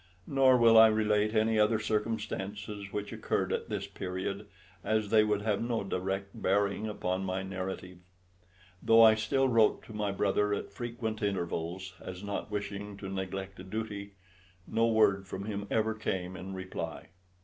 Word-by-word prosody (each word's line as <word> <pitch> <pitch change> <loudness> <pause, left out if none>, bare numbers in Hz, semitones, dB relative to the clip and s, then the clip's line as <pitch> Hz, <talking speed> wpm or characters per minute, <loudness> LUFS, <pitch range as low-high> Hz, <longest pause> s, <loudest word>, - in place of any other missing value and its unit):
Nor 135 -2 +5
will 115 -2 +7
I 110 - +10
relate 105 0 +2
any 110 0 +3
other 105 +1 +4
circumstances 105 -2 -3
which 105 0 -4
occurred - - -1
at - - -3
this - - -2
period, 95 +2 -4 0.4
as 110 -2 0
they 110 -1 +6
would 105 -1 0
have 105 -2 0
no 115 -2 -1
direct 95 +1 -2
bearing 100 +2 +1
upon 95 -2 -2
my 95 0 -2
narrative. 95 -1 -5 0.8
Though 115 0 +7
I 110 -1 +9
still 110 +5 +1
wrote 115 -4 +3
to 110 - -11
my 105 -1 -1
brother 100 +1 +1
at - - -6
frequent 115 -2 -4
intervals, 95 -1 -2
as 90 +1 -7
not 100 +1 -4
wishing 105 -1 -4
to 95 -1 -6
neglect 95 0 -5
a - - -7
duty, 100 0 -5 0.5
no 115 +1 +1
word 105 -4 +3
from 95 +2 -5
him 100 -1 -4
ever 110 0 +1
came 95 -4 -3
in 95 0 -7
reply. 95 0 -6
105 Hz, 160 wpm, -31 LUFS, 95-110 Hz, 0.8 s, I